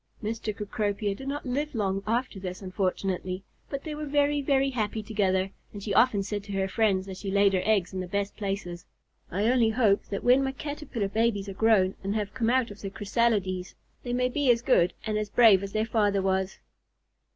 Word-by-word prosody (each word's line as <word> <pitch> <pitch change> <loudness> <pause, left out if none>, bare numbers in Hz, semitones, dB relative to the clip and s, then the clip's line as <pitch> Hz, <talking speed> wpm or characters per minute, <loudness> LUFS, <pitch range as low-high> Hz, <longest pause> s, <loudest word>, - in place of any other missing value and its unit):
Mr. 225 +2 -4
Cecropia 205 0 -2
did 265 +7 -9
not 285 +1 -3
live 280 +3 -2
long 195 -3 0
after 230 -2 -1
this, 185 +1 -6
unfortunately, 185 0 -2 0.3
but 275 -1 -4
they 310 - -5
were 300 0 -5
very, 290 0 +2
very 275 0 +2
happy 220 -3 -2
together, 195 -3 0 0.2
and 205 -1 -8
she 205 - -2
often 215 -4 +4
said 205 0 -4
to 200 0 -7
her 190 0 0
friends, 195 -2 +1
as 190 -1 -7
she 200 - -4
laid 200 0 +4
her 185 - +2
eggs 200 -5 +2
in 190 - -3
the 185 - -4
best 200 +2 -2
places, 195 -4 -4 0.5
"I 195 +4 -1
only 235 -1 +4
hope 220 -3 +2
that 200 - -5
when 255 +2 +5
my 265 0 -1
Caterpillar 275 -6 -4
babies 215 -2 0
are - - -5
grown 195 -2 +3
and 200 +2 -2
have 210 -1 -2
come 230 -3 0
out 250 -2 +2
of 205 - -11
their 195 - -4
chrysalides, 195 -3 0 0.3
they 245 - -5
may 250 +1 +2
be 280 +1 0
as 235 -1 +4
good 180 -9 +3
and 215 -1 0
as 210 -1 -3
brave 215 -4 +6
as 200 0 -5
their 215 +1 0
father 205 -3 +1
was." 190 0 0
210 Hz, 210 wpm, -27 LUFS, 195-240 Hz, 0.5 s, brave